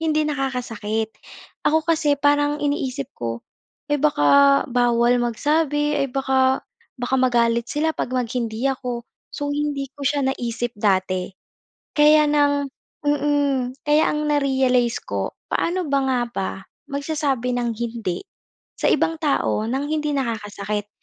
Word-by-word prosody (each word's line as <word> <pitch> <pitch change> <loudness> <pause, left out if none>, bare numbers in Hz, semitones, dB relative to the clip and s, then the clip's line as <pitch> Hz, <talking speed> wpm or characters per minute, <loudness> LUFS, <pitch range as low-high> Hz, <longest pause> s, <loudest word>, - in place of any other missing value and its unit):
hindi 310 -1 +1
nakakasakit. 240 -6 -2 0.6
Ako 315 +1 +2
kasi, 315 -3 +2
parang 290 +1 +2
iniisip 280 -3 -2
ko, 115 -1 -5 0.5
eh, 290 - +2
baka 280 - +5
bawal 240 0 +3
magsabi 295 +4 +1
ay 275 - +2
baka, 265 0 +1 0.3
baka 245 +1 -2
magalit 235 -2 +2
sila 315 +2 0
'pag - - -3
mag-hindi 240 -1 -2
ako. 245 -3 -5 0.3
So, 285 0 -2
hindi 285 -2 -2
ko 290 - -18
siya 285 0 +1
naisip 240 -2 -3
dati 185 -3 +1 0.7
kaya 300 0 +6
ng 290 -1 +3 0.6
mm, 290 -1 +2 0.3
kaya 300 +1 +5
ang 300 0 -1
na-realize 265 - +2
ko. - - -3 0.2
Paano 355 -1 -1
ba 280 0 +2
nga 260 -2 +1
ba 195 -5 -3 0.4
magsasabi 280 -4 -1
ng 240 -1 -1
hindi 225 -5 -3 0.6
sa - - 0
ibang 325 - +1
tao 280 -7 +1
ng 265 +5 -1
hindi 300 -1 0
nakakasakit? 210 -4 -3
265 Hz, 130 wpm, -22 LUFS, 235-295 Hz, 0.7 s, kaya